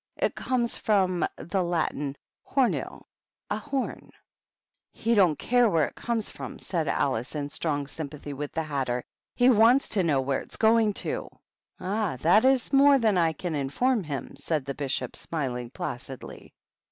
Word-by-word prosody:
It - - 0
comes 245 -2 0
from 190 -4 +2
the 190 +2 -2
Latin 150 -5 -1 0.3
homu, 265 -3 0 0.5
a - - +1
horn." 270 -2 -4 0.8
"He 230 +1 0
don't 180 -9 +4
care 245 -1 +3
where 165 -5 +3
it - - -8
comes 230 -3 -2
from," - - -8
said 165 -4 -2
Alice, 130 -1 0
in 145 -1 -3
strong 145 -2 -2
sympathy 145 0 -7
with 145 +1 -5
the 160 - -2
Hatter. 130 -5 -2 0.2
" - - -67
He 245 - +4
wants 235 +4 +5
to 205 - +2
know 155 -6 +2
where 135 0 0
it's - - -11
going 220 -1 +4
to." - - -3 0.5
"Ah, 200 -6 -1
that 190 +9 +5
is 265 0 +3
more 280 +1 +7
than 220 -5 +2
I 165 -2 +3
can 170 +2 -4
inform 190 - +1
him," 145 -4 -5
said 155 -5 -2
the 140 - -3
Bishop, 135 -3 -3
smiling 125 -7 -3
placidly. 130 0 -7
170 Hz, 165 wpm, -27 LUFS, 140-225 Hz, 0.8 s, more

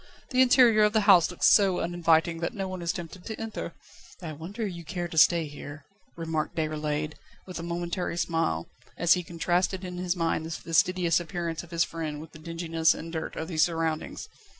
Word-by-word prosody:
the 255 0 +4
interior 245 -4 +6
of 210 0 +4
the 220 - +3
house 195 -5 +6
looks 180 - -1
so 195 -3 +4
uninviting 165 -1 +2
that 170 - -3
no 195 -2 -3
one 185 -1 -6
is 170 0 0
tempted 175 0 -8
to 220 - -6
enter." 225 -1 -5 0.4
"I 170 -5 -6
wonder 190 +9 -5
you 175 -4 -6
care 175 +1 -4
to 165 - -9
stay 165 +1 +5
here," 145 0 -9 0.3
remarked 160 -2 -2
Déroulède, 155 -1 -2 0.3
with 185 -2 -7
a - - -4
momentary 170 +1 -3
smile, 165 - 0 0.3
as 170 - +5
he 180 - 0
contrasted 175 +2 -1
in 180 -1 -6
his 180 0 -1
mind 165 -2 -1
the - - -8
fastidious 170 +1 +2
appearance 170 -1 -4
of 175 - -14
his 170 -1 +2
friend 155 -3 -5
with 155 +1 -10
the 155 - -13
dinginess 165 0 +1
and 165 +1 -8
dirt 160 - -4
of 160 - -4
these 160 -4 0
surroundings. 165 -2 -1
170 Hz, 195 wpm, -27 LUFS, 160-180 Hz, 0.4 s, interior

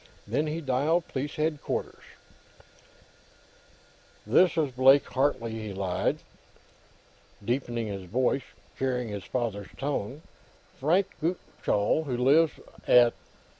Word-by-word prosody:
Then 135 +9 -1
he 155 +2 -3
dialed 150 +5 +1
Police 140 +2 -4
Headquarters. 155 -1 -2 2.2
"This 165 - +4
is 150 -4 +1
Blake 135 +3 +5
Hartley," 130 -4 0
he 110 -2 -5
lied, 95 -1 -1 1.3
deepening 120 -1 -1
his 100 -3 -5
voice 125 +7 +1
and - - -24
copying 125 -3 -1
his 100 -2 -6
father's 110 -5 -3
tone. 140 0 -3 0.6
"Frank 175 +8 +3 0.2
Gutchall, 160 - 0
who 125 -4 -2
lives 145 +6 +4 0.3
at... 120 -1 +6
130 Hz, 105 wpm, -28 LUFS, 115-150 Hz, 2.2 s, at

